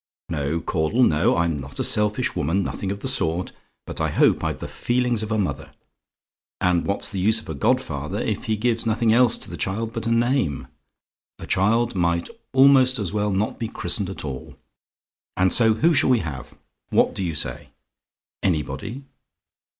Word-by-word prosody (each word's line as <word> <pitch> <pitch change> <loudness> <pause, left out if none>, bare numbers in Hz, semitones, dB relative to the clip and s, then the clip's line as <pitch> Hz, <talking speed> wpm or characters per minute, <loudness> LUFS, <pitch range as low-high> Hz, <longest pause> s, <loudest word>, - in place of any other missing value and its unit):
No, 75 0 -1
Caudle, 85 +10 0
no; 80 -3 +3
I'm 85 -2 +1
not 70 0 -8
a - - +1
selfish 105 0 +1
woman 85 +8 0
nothing 95 +1 -4
of 100 0 -6
the - - -3
sort 90 -9 +1 0.3
but - - -5
I - - +1
hope - - +3
I've - - -2
the - - -6
feelings 120 -2 0
of 110 0 -4
a 110 - +1
mother; 75 -10 -3 0.9
and 90 -2 +1
what's 100 - +1
the 95 - -3
use 110 +4 +4
of - - -13
a - - -3
godfather 70 - -1
if - - -2
he 110 -1 0
gives 115 +1 0
nothing 110 0 +2
else 120 -1 +4
to - - -4
the 85 - -6
child 110 +9 -2
but 115 -1 -3
a - - +1
name? 115 - +1 0.7
A - - -9
child 115 +5 +1
might 85 -2 0 0.2
almost 130 -1 +5
as 100 -5 -3
well 105 0 0
not 100 +3 -1
be 115 - -2
christened 105 -3 -2
at 95 - -6
all. 65 -3 -7 0.8
And 95 0 +3
so 110 -2 +4
who 165 +9 +3
shall 150 -2 +3
we 125 -3 +3
have? 75 -5 -7 0.3
What - - +2
do 95 - -3
you 85 -3 -2
say? - - -3 0.7
"ANYBODY? 95 - -2
105 Hz, 185 wpm, -23 LUFS, 85-115 Hz, 0.9 s, almost